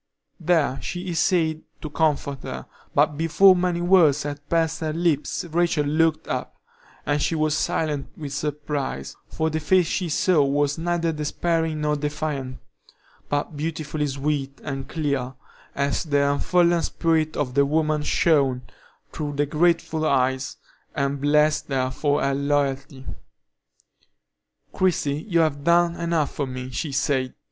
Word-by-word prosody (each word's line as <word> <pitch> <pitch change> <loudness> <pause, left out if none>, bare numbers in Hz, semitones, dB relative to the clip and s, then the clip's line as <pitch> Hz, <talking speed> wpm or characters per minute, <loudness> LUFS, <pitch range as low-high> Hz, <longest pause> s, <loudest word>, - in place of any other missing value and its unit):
There 160 -6 +1
she 180 +1 -5
essayed 165 -2 +1 0.2
to 155 - -5
comfort 145 -3 0
her, 65 0 -6 0.3
but 150 - +2
before 185 +4 +6
many 175 -1 0
words 175 -6 +4
had 145 0 -6
passed 165 -1 +1
her 155 -1 -2
lips 165 -1 0
Rachel 170 -2 +1
looked 155 +2 +1
up, - - -4 0.5
and 145 +1 0
she 165 - 0
was 155 -1 +1
silent 150 -3 -1
with 145 -3 -6
surprise, 145 - -3
for 160 0 -2
the 160 - -1
face 180 +3 +3
she 175 +2 -2
saw 160 0 +3
was 145 +2 0
neither 170 0 0
despairing 160 +1 -1
nor 150 0 +1
defiant, 145 -3 -3 0.7
but 145 +2 -2
beautifully 155 -1 -3
sweet 140 0 -2
and 135 -2 -5
clear, 140 -5 -2 0.4
as 140 0 0
the 145 -3 +2
unfallen 170 +3 +2
spirit 160 -2 0
of 130 -4 -1
the 140 +1 +4
woman 155 +1 +1
shone 140 -5 +2 0.5
through 145 -1 -4
the 145 +1 +1
grateful 160 +1 +1
eyes, 130 -2 0 0.4
and 140 0 -1
blessed 150 +1 +2
her 130 -2 -1
for 145 +1 0
her 140 0 +1
loyalty. 140 -1 -1 1.7
"Christie, 155 -5 0
you 170 -2 +3
have 145 -3 0
done 170 +1 +3
enough 170 -3 -1
for 140 - -2
me," 130 0 -6
she 145 +4 -3
said. 135 -1 0
150 Hz, 140 wpm, -24 LUFS, 140-165 Hz, 1.7 s, before